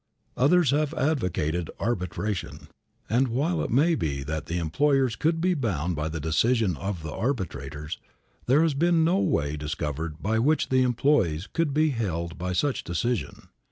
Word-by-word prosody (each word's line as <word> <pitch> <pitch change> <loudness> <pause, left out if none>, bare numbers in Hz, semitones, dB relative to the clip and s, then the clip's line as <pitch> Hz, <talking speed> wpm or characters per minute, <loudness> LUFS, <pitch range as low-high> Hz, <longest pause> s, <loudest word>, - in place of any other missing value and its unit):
Others 150 +2 +4
have 150 +2 0
advocated 90 - 0
arbitration. 100 -2 -3 0.4
And, 125 +4 +2
while 150 +9 0
it - - -2
may 150 +8 +3
be 70 - -2
that 75 +1 -4
the 85 - -2
employers 130 - +1
could 165 +1 +1
be 180 +2 +2
bound 90 - -1
by 75 +1 -2
the 80 0 -4
decision 95 - +1
of 90 +1 -4
the 75 - -5
arbitrators, 75 - -3 0.5
there 140 +6 +5
has 165 -3 +2
been 165 +3 +3
no 175 +4 +3
way 75 - 0
discovered 75 +1 -4
by 110 +4 0
which 150 +6 +2
the 130 0 +3
employees 120 - +2
could 165 +2 -1
be 155 +2 +2
held 85 -9 -3
by 90 +1 -2
such 135 +9 0
decision. 100 +7 -3
110 Hz, 160 wpm, -26 LUFS, -, 0.5 s, there